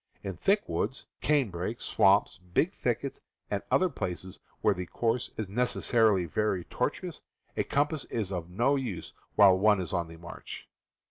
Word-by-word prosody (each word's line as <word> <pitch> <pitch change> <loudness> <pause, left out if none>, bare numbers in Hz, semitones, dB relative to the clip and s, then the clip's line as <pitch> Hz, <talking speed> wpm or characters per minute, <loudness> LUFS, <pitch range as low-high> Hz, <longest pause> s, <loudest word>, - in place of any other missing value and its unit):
In 95 -2 -4
thick 200 - +2
woods, 130 - -2 0.2
canebrakes, 115 - 0
swamps, 95 -1 +3
big 90 -1 0
thickets, - - -2 0.3
and 100 -1 0
other 185 - +4
places 95 - -5 0.2
where - - +4
the 90 0 -5
course 120 +5 0
is 110 - -2
necessarily 110 -3 +2
very 95 +2 0
tortuous, - - -3 0.3
a - - +1
compass 145 0 0
is 105 -5 -3
of 90 -2 -4
no 120 +10 +2
use 120 -11 -4 0.2
while 95 -2 +8
one 105 +1 +4
is 90 - -4
on 85 -2 0
the 80 0 -11
march. 85 +1 -9
100 Hz, 155 wpm, -29 LUFS, 90-120 Hz, 0.3 s, while